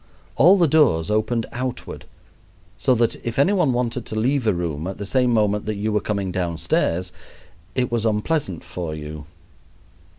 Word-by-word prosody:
All 175 Hz, +10 st, +6 dB
the 170 Hz, -3 st, +4 dB
doors 125 Hz, -, +3 dB
opened 110 Hz, +2 st, 0 dB
outward, 125 Hz, 0 st, -5 dB, 0.7 s
so 130 Hz, -2 st, +2 dB
that 115 Hz, -1 st, +1 dB
if 120 Hz, -1 st, -4 dB
any 145 Hz, +9 st, +4 dB
one 175 Hz, -9 st, +2 dB
wanted 120 Hz, -1 st, -1 dB
to -, -, -5 dB
leave 130 Hz, +1 st, +1 dB
a 105 Hz, -, +4 dB
room 85 Hz, -2 st, -3 dB
at 95 Hz, -, -5 dB
the 100 Hz, -, -5 dB
same 125 Hz, +5 st, +2 dB
moment 105 Hz, -2 st, +1 dB
that 110 Hz, 0 st, -2 dB
you 105 Hz, +2 st, -2 dB
were 105 Hz, -, +2 dB
coming 100 Hz, -3 st, -2 dB
downstairs 90 Hz, 0 st, -1 dB, 0.6 s
it 125 Hz, -2 st, 0 dB
was 115 Hz, -2 st, 0 dB
unpleasant 110 Hz, -, -1 dB
for 85 Hz, -4 st, -5 dB
you. 75 Hz, 0 st, -8 dB
110 Hz, 170 wpm, -22 LUFS, 90-125 Hz, 0.7 s, All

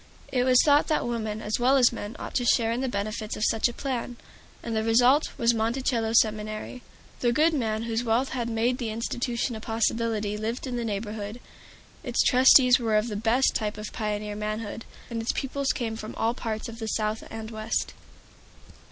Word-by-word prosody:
It 250 Hz, -1 st, +1 dB
was 255 Hz, -1 st, +5 dB
thought 290 Hz, 0 st, +4 dB
that 310 Hz, -, 0 dB
women 220 Hz, -2 st, -3 dB
as 210 Hz, +3 st, -1 dB
well 260 Hz, +3 st, +4 dB
as 250 Hz, -2 st, +5 dB
men 215 Hz, -1 st, -6 dB
ought -, -, -7 dB
to 245 Hz, -, +1 dB
share 230 Hz, -1 st, +3 dB
in 240 Hz, +2 st, -1 dB
the 265 Hz, -, -1 dB
benefits 215 Hz, 0 st, -3 dB
of 215 Hz, -, 0 dB
such 225 Hz, -, +2 dB
a 240 Hz, -, -6 dB
plan, 245 Hz, -2 st, -4 dB, 0.5 s
and 230 Hz, -1 st, -3 dB
the 220 Hz, -, 0 dB
result 245 Hz, +6 st, +4 dB
was 235 Hz, 0 st, +3 dB
Monticello 230 Hz, 0 st, 0 dB
Seminary. 215 Hz, +2 st, 0 dB, 0.4 s
The 240 Hz, -, +2 dB
good 315 Hz, +6 st, +3 dB
man 220 Hz, -6 st, -1 dB
whose 230 Hz, 0 st, -1 dB
wealth 240 Hz, +3 st, +1 dB
had 240 Hz, -2 st, -3 dB
made 235 Hz, +3 st, 0 dB
the 235 Hz, -3 st, -2 dB
institution 235 Hz, +2 st, -2 dB
a -, -, -6 dB
possibility 225 Hz, -2 st, -1 dB
lived 225 Hz, +5 st, -3 dB
in 255 Hz, -2 st, -4 dB
the 240 Hz, -, -2 dB
neighborhood. 210 Hz, +1 st, -4 dB, 0.6 s
Its 245 Hz, -4 st, +1 dB
trustees 255 Hz, 0 st, +6 dB
were 225 Hz, -3 st, +1 dB
of 215 Hz, +3 st, 0 dB
the 210 Hz, -, -4 dB
best 230 Hz, +5 st, +2 dB
type 210 Hz, -1 st, -2 dB
of 210 Hz, 0 st, -7 dB
pioneer 210 Hz, -2 st, -3 dB
manhood, 215 Hz, +1 st, -4 dB, 0.3 s
and 230 Hz, -1 st, -2 dB
its 225 Hz, -, -1 dB
pupils 275 Hz, +1 st, -1 dB
came 225 Hz, -3 st, -3 dB
from 215 Hz, -1 st, -7 dB
all 230 Hz, +1 st, 0 dB
parts 220 Hz, -3 st, -4 dB
of 230 Hz, 0 st, -9 dB
the 220 Hz, -, -4 dB
South 215 Hz, 0 st, -1 dB
and 220 Hz, 0 st, -7 dB
West. 215 Hz, 0 st, -2 dB
230 Hz, 195 wpm, -26 LUFS, 215-245 Hz, 0.6 s, trustees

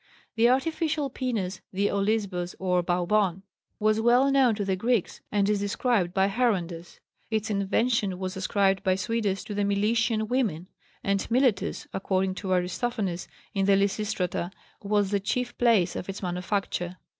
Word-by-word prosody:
The 230 Hz, +1 st, +4 dB
artificial 300 Hz, +1 st, 0 dB
penis 210 Hz, -9 st, -3 dB
(the 200 Hz, +2 st, +1 dB
olisbos, 200 Hz, -3 st, -1 dB
or 180 Hz, -1 st, +1 dB
baubon) 180 Hz, +2 st, +1 dB, 0.4 s
was 215 Hz, +1 st, +2 dB
well 245 Hz, +4 st, +4 dB
known 260 Hz, -5 st, +4 dB
to 205 Hz, -1 st, -2 dB
the 190 Hz, -1 st, +1 dB
Greeks 225 Hz, +1 st, 0 dB
and 200 Hz, -1 st, +2 dB
is 210 Hz, -1 st, +2 dB
described 205 Hz, -2 st, 0 dB
by 190 Hz, +1 st, +2 dB
Herondas. 185 Hz, -7 st, -1 dB, 0.3 s
Its 220 Hz, 0 st, -1 dB
invention 200 Hz, 0 st, +1 dB
was 185 Hz, 0 st, -4 dB
ascribed 195 Hz, 0 st, +1 dB
by 185 Hz, -1 st, +2 dB
Suidas 205 Hz, -1 st, -1 dB
to 210 Hz, -, -5 dB
the 205 Hz, -, -1 dB
Milesian 215 Hz, +2 st, +1 dB
women, 215 Hz, -10 st, 0 dB, 0.4 s
and 195 Hz, 0 st, 0 dB
Miletus, 245 Hz, -3 st, +1 dB
according 190 Hz, 0 st, 0 dB
to 190 Hz, 0 st, -5 dB
Aristophanes 185 Hz, +1 st, -1 dB, 0.3 s
in 195 Hz, -2 st, +1 dB
the 200 Hz, -, +6 dB
Lysistrata, 200 Hz, -3 st, -1 dB, 0.3 s
was 205 Hz, -1 st, +1 dB
the 200 Hz, -, +2 dB
chief 245 Hz, +5 st, -2 dB
place 230 Hz, -7 st, +3 dB
of 180 Hz, -, -5 dB
its 195 Hz, +1 st, -6 dB
manufacture. 180 Hz, 0 st, -2 dB
200 Hz, 150 wpm, -27 LUFS, 185-225 Hz, 0.4 s, the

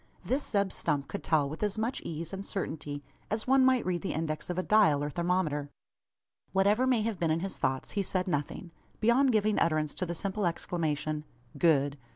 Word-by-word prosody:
This 275 Hz, +3 st, 0 dB
Zeb 200 Hz, -3 st, 0 dB
Stump 145 Hz, -4 st, -1 dB
could 200 Hz, -, -5 dB
tell 150 Hz, -3 st, +2 dB
with 155 Hz, +3 st, -7 dB
as 210 Hz, 0 st, 0 dB
much 225 Hz, +4 st, -1 dB
ease 165 Hz, +2 st, -5 dB
and 195 Hz, 0 st, -4 dB
certainty, 150 Hz, -7 st, -4 dB, 0.3 s
as 215 Hz, +1 st, -1 dB
one 265 Hz, +1 st, +5 dB
might 260 Hz, -2 st, +4 dB
read 180 Hz, -1 st, -1 dB
the 195 Hz, -, -2 dB
index 155 Hz, +1 st, -3 dB
of 180 Hz, -, -2 dB
a 185 Hz, -, 0 dB
dial, 160 Hz, -10 st, +4 dB
or 145 Hz, -, -2 dB
thermometer. 170 Hz, -4 st, 0 dB, 0.8 s
Whatever 205 Hz, +6 st, +3 dB
may 245 Hz, -4 st, +3 dB
have 220 Hz, -3 st, -2 dB
been 165 Hz, -, +1 dB
in 160 Hz, +1 st, +1 dB
his 195 Hz, +1 st, -4 dB
thoughts, 130 Hz, 0 st, -1 dB
he 205 Hz, -, 0 dB
said 185 Hz, -1 st, -1 dB
nothing, 165 Hz, +2 st, -3 dB, 0.3 s
beyond 250 Hz, +4 st, +4 dB
giving 215 Hz, -1 st, +2 dB
utterance 155 Hz, -2 st, +1 dB
to 185 Hz, -, -3 dB
the 170 Hz, -, -3 dB
simple 195 Hz, +2 st, -1 dB
exclamation 155 Hz, -3 st, -2 dB, 0.3 s
"Good!" 145 Hz, -4 st, +2 dB
180 Hz, 195 wpm, -30 LUFS, 155-210 Hz, 0.8 s, one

